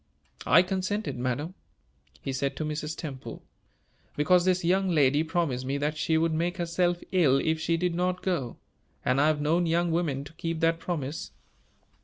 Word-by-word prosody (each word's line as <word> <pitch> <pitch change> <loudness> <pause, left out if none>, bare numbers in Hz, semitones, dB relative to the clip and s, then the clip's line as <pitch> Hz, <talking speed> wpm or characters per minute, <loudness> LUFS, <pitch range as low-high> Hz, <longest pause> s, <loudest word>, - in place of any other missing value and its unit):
"I 175 - +7
consented, 190 +3 -2
madam," 130 +7 -2 0.7
he 135 - -3
said 135 +1 -1
to 155 - -3
Mrs. 150 +1 -4
Temple, 135 -5 -7 0.7
"because 175 +4 +3
this 185 -1 +2
young 190 +2 +2
lady 145 -3 +3
promised 160 -6 -1
me 135 +2 -2
that 150 +2 -1
she 160 +1 +1
would 165 0 +1
make 175 +3 -1
herself 175 0 0
ill 155 -8 +4
if 160 +3 0
she 165 +1 0
did 175 0 0
not 180 +1 -1
go; 145 -11 -2 0.5
and 130 +2 +3
I 150 - +4
have 155 -1 +1
known 165 +4 +2
young 170 +1 +1
women 155 -5 0
to 145 - -12
keep 165 0 -3
that 165 0 +2
promise. 155 -4 -4
165 Hz, 175 wpm, -28 LUFS, 145-175 Hz, 0.7 s, I